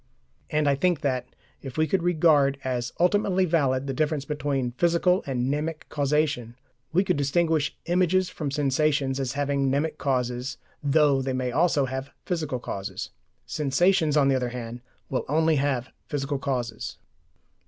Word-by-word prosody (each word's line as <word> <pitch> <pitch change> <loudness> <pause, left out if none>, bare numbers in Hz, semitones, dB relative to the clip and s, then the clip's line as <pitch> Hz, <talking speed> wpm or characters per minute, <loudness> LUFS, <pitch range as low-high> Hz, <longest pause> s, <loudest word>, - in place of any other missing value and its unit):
And 150 -1 +1
I 140 - +4
think 165 +3 +1
that, 130 -4 -1 0.3
if 135 -1 -8
we 155 - +3
could 180 +4 0
regard 155 -5 +3
as 120 -2 -2
ultimately 190 +1 +3
valid 140 -6 +1
the 135 - -2
difference 150 0 0
between 140 -4 -1
physical 170 +6 +2
and 125 -2 -1
mnemic 150 +3 -2
causation, 145 -5 0 0.4
we 185 +4 +3
could 180 -5 0
distinguish 155 +1 +1
images 180 +1 +2
from 150 -5 -4
sensations 140 -1 +1
as 130 -3 -2
having 140 -1 0
mnemic 150 +3 -1
causes, 125 -1 -1 0.3
though 145 -1 +4
they 130 0 -2
may 130 -1 -1
also 150 0 +2
have 130 +1 -4 0.2
physical 155 -7 -2
causes. 100 -5 -5 0.3
Sensations, 155 +2 +2
on 140 -2 +4
the 135 - +3
other 125 -1 0
hand, 120 0 -6 0.3
will 130 - 0
only 160 +1 +3
have 135 -3 -1 0.2
physical 140 -1 -2
causes. 120 -5 -3
140 Hz, 155 wpm, -26 LUFS, 130-160 Hz, 0.4 s, I